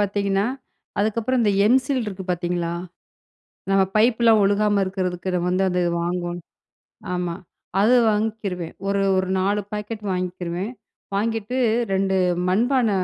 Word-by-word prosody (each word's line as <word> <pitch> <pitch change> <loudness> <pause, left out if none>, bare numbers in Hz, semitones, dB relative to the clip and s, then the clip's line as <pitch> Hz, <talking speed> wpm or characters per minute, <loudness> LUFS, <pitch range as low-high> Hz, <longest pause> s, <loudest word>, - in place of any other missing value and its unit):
பார்த்தீங்கன்னா, 200 0 +1 0.5
அதுக்கப்பறம் 225 +4 +1
இந்த 205 - +3
எம்சில் 255 +2 +2
இருக்கு 190 -2 -6
பார்த்தீங்களா! 175 -1 -1 1.0
நம்ம 195 0 +4
பைப் 225 +2 +4
லாம் 220 -2 +6
ஒழுகாம 205 0 +2
இருக்கிறதுக்கு 185 -1 -2
வந்து 185 +2 +1
அது 180 0 0 0.2
வாங்குவோம். 175 0 -2 0.7
ஆமா. 180 -1 -2 0.5
அது 240 +4 +5 0.2
வாங்கிக்கிருவேன். 210 -5 -2
ஒரு, 200 0 +1 0.2
ஒரு 185 0 0
4 200 +2 +1
பாக்கெட் 210 +1 -5
வாங்கிக்கிருவேன். 180 +2 -3 0.4
வாங்கிட்டு 225 +3 -1 0.4
2 190 0 +1 0.3
மண்பான 240 +5 +2
200 Hz, 115 wpm, -23 LUFS, 180-215 Hz, 1.0 s, லாம்